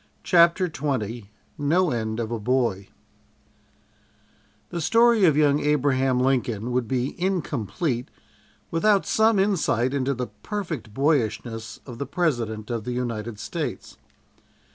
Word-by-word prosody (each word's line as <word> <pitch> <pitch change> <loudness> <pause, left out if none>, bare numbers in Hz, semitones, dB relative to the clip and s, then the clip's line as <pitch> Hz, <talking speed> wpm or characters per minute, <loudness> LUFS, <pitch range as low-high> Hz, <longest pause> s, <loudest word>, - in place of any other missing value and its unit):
CHAPTER 175 +1 +4
XX 120 - -3 0.3
"NO 165 +5 +2
END 110 -2 -2
OF 115 -1 -3
A 115 - -2
BOY" 115 -4 0 1.8
"THE 170 -1 -3
STORY 230 +5 +4
OF 155 -4 +4
YOUNG 145 -1 +4
ABRAHAM 135 -3 +2
LINCOLN" 125 -3 0
would 125 -2 0
be 130 +1 -1
incomplete 145 - -1 0.6
without 200 +4 +3
some 220 0 +3
insight 165 - +1
into 140 0 0
the 125 0 -4
perfect 165 - -4
boyishness 115 -4 -1
of 125 -3 -9
the 140 - -3
President 120 -10 -1
of 115 -2 -2
the 125 - -4
United 115 -3 -3
States. 105 - -5
130 Hz, 120 wpm, -24 LUFS, 115-165 Hz, 1.8 s, CHAPTER